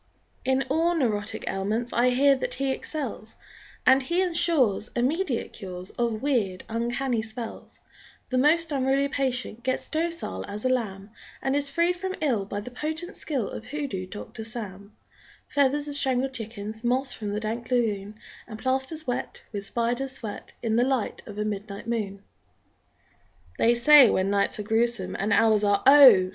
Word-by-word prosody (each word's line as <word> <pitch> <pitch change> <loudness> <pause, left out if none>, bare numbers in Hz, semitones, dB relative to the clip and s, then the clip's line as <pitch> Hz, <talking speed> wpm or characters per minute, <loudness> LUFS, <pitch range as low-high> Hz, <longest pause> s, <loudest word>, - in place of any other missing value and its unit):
_ - - -40 0.4
In 265 +1 +2
all 330 +3 +2
neurotic 220 -8 -1
ailments 215 +5 -2
I 245 +1 +4
hear 275 +3 +5
that 260 - -3
he 270 0 0
excels, 260 -6 -5 0.5
And 265 +1 +6
he 340 +8 +1
insures 320 - +1
Immediate 265 +2 0
cures 185 -3 -7
Of 235 -1 -2
weird, 220 -10 0
uncanny 240 +1 -1
spells; 220 +1 -7 0.5
The 255 - +1
most 315 +4 +3
unruly 275 0 +1
patient 255 -4 -2
Gets 260 +1 -2
docile 320 - -2
as 210 +4 -6
a - - +3
lamb 210 -5 -2 0.3
And 270 +1 -1
is 285 -1 +2
freed 340 +5 +2
from 375 +1 -3
ill 240 -10 0
by 205 +1 -4
the 250 - -9
potent 315 +8 -4
skill 265 -10 -3
Of 220 - -7
Hoodoo 255 -10 -4
Doctor 205 +3 -8
Sam; 210 -3 -7 0.5
Feathers 285 +1 +1
of 290 - -5
strangled 265 -1 0
chickens, 220 -2 -6
Moss 250 +1 +1
from 210 -2 -5
the 210 - -1
dank 225 +2 -4
lagoon, 215 -5 0 0.3
And 215 - -8
plasters 265 +6 -1
wet 245 - -4
With 205 -2 -4
spider 240 +4 -1
sweat 255 -6 -5
In 225 -1 +1
the 240 - +4
light 260 -4 -1
of 205 - -9
a 210 - -1
midnight 205 0 -5
moon! 205 -4 -3 1.4
They 235 +1 +4
say 270 +1 +8
when 190 +1 +1
nights 200 0 +1
are 210 - -4
grewsome 235 +2 +1
And 205 +3 -1
hours 215 0 +4
are, 200 -1 +2
oh! 260 -10 +8
240 Hz, 165 wpm, -26 LUFS, 210-275 Hz, 1.4 s, say